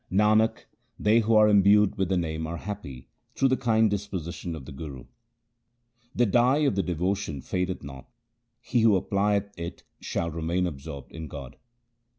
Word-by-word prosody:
Nanak, 110 +3 +3 0.3
they 110 +2 +4
who 115 0 +2
are 110 0 +7
imbued 105 0 +5
with 95 -2 -1
the 95 - +2
Name 80 -2 -2
are 85 +1 -4
happy 80 -10 -7 0.3
through 135 - +3
the 130 - +3
kind 115 -4 +2
disposition 95 -4 -4
of 70 -5 -9
the - - -9
Guru. 70 -3 -8 1.1
The 120 - +3
dye 120 +6 +3
of 140 - +2
devotion 90 -2 -1
fadeth 90 +6 -3
not; 65 -2 -10 0.5
he 125 - -1
who 110 -3 +5
applieth 100 +1 0
it 85 0 -6 0.2
shall 85 0 -3
remain 85 +3 -1
absorbed 70 -3 -7
in 80 -1 -7
God. 70 -5 -9
95 Hz, 160 wpm, -26 LUFS, 80-105 Hz, 1.1 s, are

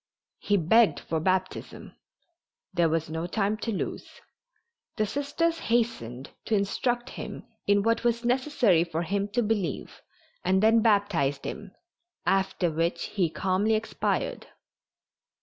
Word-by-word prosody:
He 205 - +2
begged 215 +6 +4
for 160 - -2
baptism. 185 +2 -2 0.8
There 170 -2 +3
was 160 0 0
no 160 +2 -3
time 205 +3 0
to 225 +1 -3
lose. 200 - -4 0.9
The 215 -2 +1
Sisters 295 +7 -1
hastened 225 - -1
to 220 - +1
instruct 240 +5 -1
him - - -7 0.2
in 200 0 +4
what 230 +1 +1
was 235 0 +1
necessary 245 - +3
for 170 -1 -3
him 200 +4 -1
to 240 - +2
believe 210 -4 -2 0.4
and 190 +2 +2
then 225 +1 +5
baptized 200 -11 +2
him, 205 -3 -7 0.5
after 190 -2 +1
which 165 +3 -1
he 185 -5 +1
calmly 195 +6 +1
expired. 220 +1 -2
200 Hz, 130 wpm, -27 LUFS, 175-230 Hz, 0.9 s, then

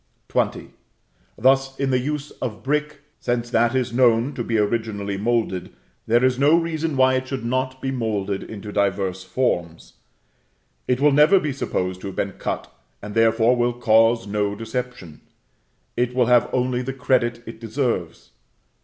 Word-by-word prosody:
XX. - - -1 0.7
Thus 135 +2 +2
in 135 -1 0
the 130 - +2
use 150 +2 -4
of 115 -4 -4
brick; 150 +1 -1 0.2
since 120 0 -2
that 120 +1 +2
is 125 -2 0
known 120 +1 +3
to 120 - -4
be 115 -1 -1
originally 105 -2 -1
moulded, 105 -3 -1 0.3
there 120 +3 +4
is 130 0 +1
no 150 +4 +5
reason 165 -3 -2
why 130 0 +5
it 130 0 -1
should 130 -3 -4
not 130 +2 -1
be 135 - -1
moulded 105 -6 -2
into 105 -1 -8
diverse 95 -2 -1
forms. 85 -8 -2 0.9
It 125 0 +1
will 145 +1 +4
never 150 +7 +6
be 150 -5 -2
supposed 95 -8 -3
to - - -6
have 95 - -7
been 100 - -1
cut, - - -4 0.3
and 105 0 -8
therefore, 115 +2 +3
will 120 0 +1
cause 115 0 +3
no 100 0 -1
deception; 115 - -6 0.7
it 125 +1 -1
will 125 -1 +3
have 120 0 +4
only 125 -1 0
the 135 +1 -4
credit 120 -2 0
it 115 0 -9
deserves. 115 - -3
120 Hz, 160 wpm, -22 LUFS, 110-130 Hz, 0.9 s, never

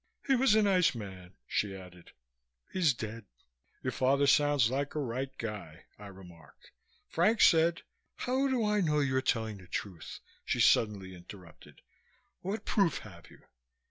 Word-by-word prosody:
He 270 - +2
was 255 -4 +4
a 220 - +4
nice 185 -6 +3
man," 95 -4 -9
she 100 +7 -2
added. 90 -2 -13 0.6
"He's 175 -5 +3
dead." 110 0 -7 0.6
"Your - - -1
father 140 +2 +2
sounds 145 -4 +3
like 140 +2 -2
a - - -1
right 130 0 -3
guy," 105 -9 -7
I 105 - -9
remarked. 90 -4 -15 0.4
"Frank 210 +7 +2
said 165 +1 +4 0.2
" - - -50
"How 260 +2 +1
do 255 -4 0
I 210 -1 +1
know 150 -4 +1
you're 130 -2 +1
telling 110 -5 -1
the 95 - -15
truth?" 90 -3 -6 0.2
she - - -2
suddenly 100 -4 +2
interrupted. 90 -1 -14 0.6
"What 205 +4 -4
proof 195 -6 +2
have 85 -5 -13
you?" - - -18
130 Hz, 155 wpm, -31 LUFS, -, 0.6 s, was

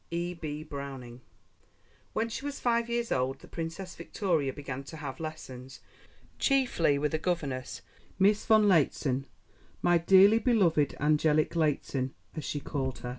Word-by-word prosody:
E.B. 170 -3 -4
BROWNING 135 -5 -8 0.9
When 225 - 0
she 230 +4 -6
was 285 -1 -4
five 235 -1 +1
years 235 0 -1
old 130 +2 0
the - - -15
Princess 170 +3 -6
Victoria 170 -5 -1
began 135 -1 -6
to 160 - -9
have 140 -3 -6
lessons, 135 -5 -8 0.6
chiefly 250 - +2
with 150 +2 -1
a 155 - +1
governess, 145 -7 -3 0.3
Miss 200 +2 +3
von 215 -2 +5
Lehzen 140 -6 +2 0.6
"my 175 -1 +4
dearly 195 +5 +6
beloved 185 - +2
angelic 150 +1 +2
Lehzen," 140 -4 0 0.2
as 155 - -4
she 145 - -3
called 135 -2 -3
her. 125 - -5
155 Hz, 140 wpm, -29 LUFS, 140-190 Hz, 0.9 s, dearly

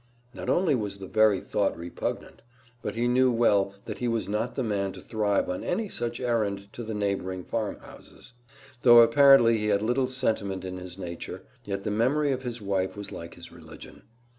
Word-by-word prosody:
Not - - -6
only 175 -4 +3
was 105 -5 -2
the 95 - -8
very 110 -1 +3
thought 100 - -1
repugnant, 85 +1 -5 0.4
but - - -4
he 120 +1 0
knew 130 +1 +3
well 100 -4 +2
that - - -6
he 125 - -1
was 115 -1 -1
not 105 +4 -2
the 130 - -1
man 100 -3 -1
to - - -11
thrive 105 -3 0
on 90 - -3
any 220 -2 -2
such 120 -6 -3
errand 105 -5 -1
to - - -7
the 110 -1 -5
neighboring 95 -3 -2
farmhouses. 110 +2 -7 0.5
Though 120 -1 +8
apparently 115 -1 +6
he 105 - -1
had 100 0 +2
little 125 +3 +1
sentiment 110 -7 -2
in 95 0 -5
his 90 0 -9
nature, 85 -3 -7 0.2
yet 100 -1 -4
the 105 - -2
memory 135 +7 +1
of 130 -1 -2
his 120 -3 -6
wife 95 0 -1
was 100 - -6
like 85 0 -8
his 85 - -11
religion. - - -13
110 Hz, 190 wpm, -27 LUFS, 100-120 Hz, 0.5 s, Though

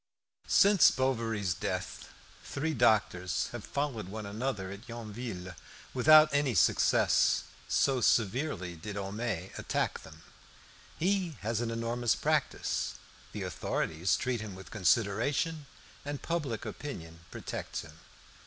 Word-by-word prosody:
Since 200 -2 +6
Bovary's 115 -7 0
death - - -4 0.3
three 155 +3 -2
doctors 105 - +2
have 120 -3 -6
followed 140 -9 -3
one 105 +2 -6
another 105 -2 -3
at 105 +5 -10
Yonville 110 -5 -6 0.4
without 155 +4 +7
any 145 -4 +2
success, - - +4 0.2
so 135 -2 +2
severely 110 - +1
did 100 +5 -7
Homais 100 -2 -3
attack - - -1
them. 80 +1 -14 0.7
He 180 -4 0
has 110 +2 -1
an 120 - -1
enormous 115 0 0
practice; - - 0 0.4
the 105 - -5
authorities 85 0 -1
treat 125 -3 -1
him 105 -4 -7
with 95 0 -11
consideration, 120 - +1 0.4
and 145 0 -4
public 150 -10 -2
opinion 85 - -7
protects - - -5
him. - - -14
115 Hz, 115 wpm, -31 LUFS, 95-135 Hz, 0.7 s, without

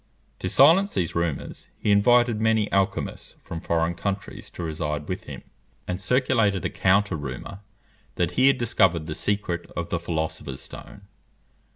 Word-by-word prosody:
To 95 - -3
silence 170 - +5
these 85 -3 -1
rumours, 85 -4 -3
he 105 - 0
invited 120 +2 +4
many 110 -1 +2
alchymists 95 -1 -1
from 80 - -6
foreign 85 0 0
countries 100 +3 -5
to 90 - -7
reside 75 -2 -3
with - - -4
him, - - -8 0.4
and 90 +1 -3
circulated 115 -3 +2
a - - -1
counter 100 0 +2
rumour, 75 +6 -6 0.6
that 90 -2 0
he 130 +1 +3
had 135 -1 +4
discovered 95 -9 +2
the 80 - -4
secret 95 -2 -2
of 85 -1 -3
the 85 - -1
philosopher's 80 -5 -3
stone. - - -10
95 Hz, 155 wpm, -25 LUFS, 85-110 Hz, 0.6 s, silence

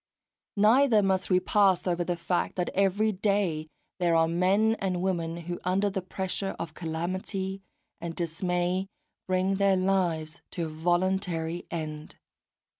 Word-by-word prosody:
Neither 220 +1 +5
must 190 -1 +1
we 180 -1 +5
pass 195 -1 +3
over 175 -1 0
the 175 0 -1
fact 175 +1 -1
that 180 -1 -1
every 200 +3 +2
day 190 -6 0 0.3
there 170 -2 +2
are 165 0 +4
men 190 +6 +3
and 185 -3 -1
women 170 -3 -1
who, 175 +1 -5
under 195 +3 +1
the 190 -1 -2
pressure 190 +1 -3
of 165 -2 -5
calamity 185 +4 -3 0.4
and 170 -1 -5
dismay, 180 +2 -1 0.4
bring 185 +1 +1
their 195 -1 +3
lives 175 -5 0
to 170 - -2
a - - -4
voluntary 175 0 -1
end. 155 -2 -5
185 Hz, 140 wpm, -28 LUFS, 170-195 Hz, 0.4 s, Neither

